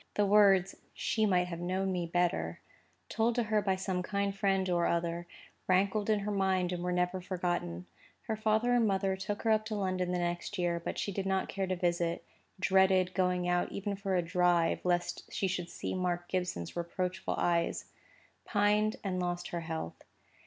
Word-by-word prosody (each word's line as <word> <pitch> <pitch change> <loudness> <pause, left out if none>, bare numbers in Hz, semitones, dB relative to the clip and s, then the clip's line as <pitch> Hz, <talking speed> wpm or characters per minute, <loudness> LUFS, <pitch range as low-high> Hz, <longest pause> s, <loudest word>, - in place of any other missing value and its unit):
The 205 - +3
words, 195 -2 +5 0.2
"She 220 -4 +1
might 180 -2 +3
have 170 -1 -5
known 185 +2 -1
me 175 -2 -2
better," 165 - 0 0.5
told 225 - +1
to 240 - +2
her 215 -1 +1
by 190 -1 +1
some 185 -1 -2
kind 200 +1 -1
friend 195 -1 +1
or 175 -1 +2
other, 170 0 -1 0.4
rankled 200 +3 +2
in 210 -1 +3
her 210 +1 -2
mind, 190 -2 +1
and 175 - -3
were 180 - -1
never 180 +1 0
forgotten. 175 - -2 0.4
Her 220 - -2
father 220 +3 +2
and 235 -2 +4
mother 195 -1 +1
took 205 +2 -4
her 225 - +3
up 215 0 +3
to 215 0 -3
London 185 -2 -1
the 180 - 0
next 175 +3 -2
year; 175 -1 0
but - - -4
she 200 - -2
did 195 0 -3
not 190 0 0
care 195 -1 -2
to 185 - 0
visit—dreaded 185 +2 +1
going 180 -1 +1
out 175 0 +1
even 200 0 -3
for 195 -1 -2
a 175 - +2
drive, 175 -1 +2
lest 175 -1 -1
she 195 - 0
should 180 -2 -3
see - - -4
Mark 175 -1 -1
Gibson's 180 - -3
reproachful 180 +2 -2
eyes—pined 205 +4 -1
and 185 -2 -1
lost 175 0 -2
her 170 - -3
health. 160 - -5
185 Hz, 180 wpm, -31 LUFS, 175-200 Hz, 0.5 s, words